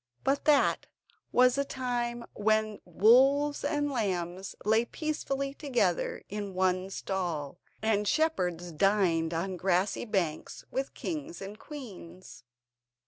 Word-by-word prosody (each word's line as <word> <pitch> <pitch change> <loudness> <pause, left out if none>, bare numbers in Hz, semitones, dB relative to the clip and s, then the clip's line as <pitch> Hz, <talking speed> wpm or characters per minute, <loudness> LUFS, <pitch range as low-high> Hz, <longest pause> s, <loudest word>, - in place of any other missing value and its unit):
But 275 +1 +1
that 295 -2 +3 0.4
was 250 0 +5
the 280 - +1
time 240 -3 -3
when 215 0 +1
wolves 265 - +4
and 290 -1 0
lambs 190 -5 -2
lay 220 +2 +4
peacefully 275 -1 -3
together 245 - 0
in 205 -2 -5
one 185 0 +1
stall, 175 -6 -3 0.2
and 210 -2 +1
shepherds 180 - 0
dined 170 -2 +2
on 180 +3 -2
grassy 185 +4 +1
banks 180 -8 -2
with 270 +1 -3
kings 315 0 -5
and 200 +2 -8
queens. 185 - -10
210 Hz, 115 wpm, -30 LUFS, 185-270 Hz, 0.4 s, was